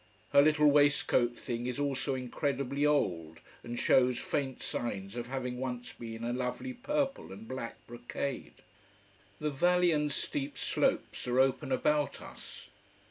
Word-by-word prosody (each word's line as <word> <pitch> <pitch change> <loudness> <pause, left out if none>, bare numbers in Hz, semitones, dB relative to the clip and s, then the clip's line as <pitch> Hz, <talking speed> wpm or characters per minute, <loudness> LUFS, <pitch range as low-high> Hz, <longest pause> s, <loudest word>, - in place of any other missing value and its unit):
Her 140 - +8
little 150 0 +4
waistcoat 140 -4 +4
thing 120 0 -3
is 125 - -3
also 140 -1 0
incredibly 140 +2 -1
old, 85 - 0 0.2
and 120 0 -5
shows 125 -1 +4
faint 135 -3 -2
signs 100 -3 -3
of 120 -1 -4
having 125 -1 -3
once 125 -2 -4
been 115 -1 -7
a 120 +1 -1
lovely 125 - -3
purple 275 - -2
and 100 +4 -9
black 130 -2 -6
brocade. 120 +3 -5 0.8
The 150 0 -1
valley 175 +4 +3
and 150 -2 +1
steep 140 0 -3
slopes - - 0
are 125 +1 +2
open 135 0 +2
about 150 +2 +1
us. - - -11
130 Hz, 140 wpm, -31 LUFS, 120-145 Hz, 0.8 s, Her